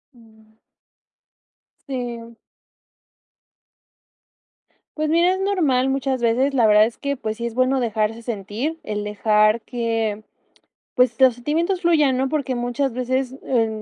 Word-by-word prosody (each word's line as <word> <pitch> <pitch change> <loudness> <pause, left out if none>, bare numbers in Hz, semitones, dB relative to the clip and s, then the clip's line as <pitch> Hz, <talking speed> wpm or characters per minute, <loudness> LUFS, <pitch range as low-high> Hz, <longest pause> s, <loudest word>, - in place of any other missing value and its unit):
Mm. 220 -2 -21 1.4
Sí. 240 -3 -6 2.6
Pues 310 0 0
mira, 340 +3 +3
es 375 - -3
normal, 320 -11 +1
muchas 270 -1 -1
veces. 245 +4 +1
La 240 -5 +4
verdad 210 0 +6
es 230 - -6
que 280 0 -2
pues 220 -4 -5
sí, 235 - -4
es 235 - -4
bueno 255 +1 +2
dejarse 225 -1 -1
sentir, 230 +7 -4
el 210 -1 -4
dejar 215 +1 +2
que, 225 -3 -2 0.7
pues, 250 -2 +2
los 260 -2 +5
sentimientos 330 +9 -1
fluyan, 305 -7 +3
¿no?, 265 +1 0
porque 280 -3 -2
muchas 245 +2 -1
veces, 255 +1 -2
eh, 230 -4 +1
245 Hz, 130 wpm, -21 LUFS, 225-270 Hz, 2.6 s, verdad